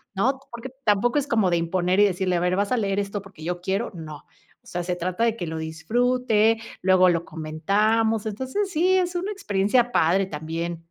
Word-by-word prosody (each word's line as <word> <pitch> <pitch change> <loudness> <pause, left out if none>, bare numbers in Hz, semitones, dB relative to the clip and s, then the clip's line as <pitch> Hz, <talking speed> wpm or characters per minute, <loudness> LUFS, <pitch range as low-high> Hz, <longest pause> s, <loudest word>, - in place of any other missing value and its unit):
¿no? 265 +7 +1
Porque 240 +2 -8
tampoco 235 +6 +2
es 285 - -3
como 220 -8 +2
de 170 - +3
imponer 180 +3 0
y 205 - +7
decirle: 185 -2 0
"A - - +1
ver, 180 +1 +1
vas 200 +3 -1
a 250 - +2
leer 195 -3 -1
esto 200 0 -2
porque 195 -5 -14
yo 175 +1 -3
quiero". 195 +5 -2
No. 155 -4 -9 0.4
O - - -21
sea, 175 - -3
se 180 0 -2
trata 180 +5 -2
de 230 -1 +2
que 175 - -4
lo 160 0 -4
disfrute, 225 +7 +1 0.2
luego 185 -1 +5
lo 170 -1 +1
comentamos, 210 +8 0
entonces 260 - -2
sí 365 +3 +3
es 360 -1 0
una 380 +4 -2
experiencia 235 - +1
padre 185 +5 +3
también. 165 +1 -5
195 Hz, 205 wpm, -24 LUFS, 175-235 Hz, 0.4 s, y